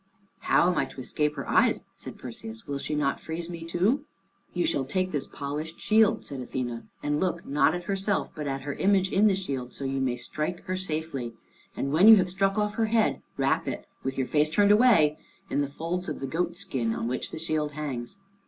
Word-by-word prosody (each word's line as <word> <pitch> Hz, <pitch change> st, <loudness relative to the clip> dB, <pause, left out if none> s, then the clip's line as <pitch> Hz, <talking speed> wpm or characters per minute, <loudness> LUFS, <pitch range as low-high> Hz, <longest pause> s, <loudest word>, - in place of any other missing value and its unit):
"How -, -, +3 dB
am 180 Hz, -, +2 dB
I -, -, +2 dB
to -, -, -11 dB
escape 150 Hz, +3 st, -1 dB
her -, -, -5 dB
eyes?" -, -, +3 dB
said -, -, -9 dB
Perseus; 225 Hz, -, -8 dB
"will 140 Hz, -1 st, -3 dB
she 150 Hz, -, -3 dB
not 140 Hz, -2 st, 0 dB
freeze 165 Hz, +2 st, -5 dB
me 170 Hz, -1 st, -6 dB
too?" 195 Hz, -, +1 dB, 0.5 s
"You 175 Hz, -, 0 dB
shall 140 Hz, -5 st, +1 dB
take 185 Hz, +7 st, -1 dB
this 145 Hz, -2 st, -1 dB
polished 150 Hz, +3 st, -5 dB
shield," 220 Hz, 0 st, +3 dB
said 140 Hz, -, -6 dB
Athene, 120 Hz, -2 st, -4 dB
"and 145 Hz, 0 st, 0 dB
look, 175 Hz, -2 st, -1 dB
not 145 Hz, +3 st, +3 dB
at 175 Hz, -, -3 dB
her -, -, -13 dB
herself, 195 Hz, +1 st, -1 dB
but 150 Hz, -2 st, -5 dB
at 135 Hz, -1 st, -2 dB
her 140 Hz, 0 st, -3 dB
image 190 Hz, +1 st, +2 dB
in 205 Hz, +3 st, +5 dB
the 195 Hz, -, +4 dB
shield, 135 Hz, -10 st, -4 dB
so 140 Hz, -, -4 dB
you 135 Hz, 0 st, -1 dB
may 130 Hz, -2 st, +1 dB
strike 155 Hz, +7 st, -3 dB
her 185 Hz, -1 st, -2 dB
safely. 155 Hz, -9 st, -3 dB, 0.4 s
And 140 Hz, +1 st, -2 dB
when 180 Hz, +7 st, +6 dB
you 225 Hz, -, +12 dB
have 185 Hz, -3 st, +2 dB
struck 195 Hz, +2 st, +1 dB
off 210 Hz, 0 st, +1 dB
her 225 Hz, -1 st, +2 dB
head, 220 Hz, 0 st, +2 dB, 0.2 s
wrap -, -, +1 dB
it, -, -, -4 dB, 0.2 s
with 135 Hz, 0 st, -3 dB
your 130 Hz, -, +1 dB
face 150 Hz, +3 st, +2 dB
turned 205 Hz, +6 st, +4 dB
away, 210 Hz, -10 st, +5 dB, 0.3 s
in 145 Hz, -, +2 dB
the 140 Hz, -, 0 dB
folds 170 Hz, +5 st, -3 dB
of 150 Hz, -, -4 dB
the 135 Hz, -, -3 dB
goat 170 Hz, +5 st, -1 dB
skin 125 Hz, -11 st, -1 dB
on 115 Hz, -, -2 dB
which 125 Hz, +1 st, -2 dB
the -, -, -7 dB
shield 155 Hz, -2 st, -1 dB
hangs. 140 Hz, 0 st, -5 dB
160 Hz, 225 wpm, -27 LUFS, 140-190 Hz, 0.5 s, you